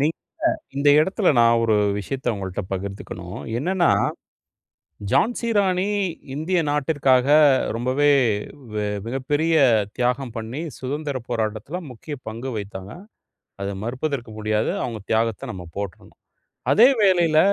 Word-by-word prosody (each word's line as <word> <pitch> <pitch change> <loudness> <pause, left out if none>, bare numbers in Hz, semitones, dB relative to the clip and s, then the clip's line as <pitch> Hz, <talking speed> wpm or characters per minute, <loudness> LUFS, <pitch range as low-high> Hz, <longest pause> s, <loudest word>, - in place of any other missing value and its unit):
நீங்க 155 +3 +2 0.6
இந்த 140 +1 +3
எடத்தில, 190 +4 +1
நான் 115 0 +5
ஒரு 110 -2 +3 0.2
விஷயத்த 125 +3 -2
ஒங்கள்ட்ட 95 -1 -4
பகிர்ந்துக்கணும். 100 +1 -6 0.2
என்னன்னா, 175 +5 +2 1.2
ஜான்சி 235 +1 +1
ராணி 190 -1 +2 0.5
இந்திய 165 +5 0
நாட்டிற்காக 140 -3 +2 0.5
ரொம்பவே 130 +5 +2 0.6
வெ 105 -1 -1 0.2
மிகப்பெரிய 145 +6 0 0.4
தியாகம் 125 0 0
பண்ணி, 115 +6 -5 0.2
சுதந்திரப் 135 -2 -4
போராட்டத்தில 110 +6 -2
முக்கிய 125 +5 -7
பங்கு 115 +4 -5
வகித்தாங்க. 100 -2 -6 0.7
அத 100 - -2
மறுப்பதற்கு 125 0 -3
முடியாது. 110 0 0
அவங்க 115 -3 -4
தியாகத்த 110 -1 0
நாம 90 -2 -8
போற்றணும். 100 -3 -7 0.6
அதே 235 +5 +7
வேளையில, 175 -5 +4
130 Hz, 110 wpm, -23 LUFS, 110-155 Hz, 1.2 s, அதே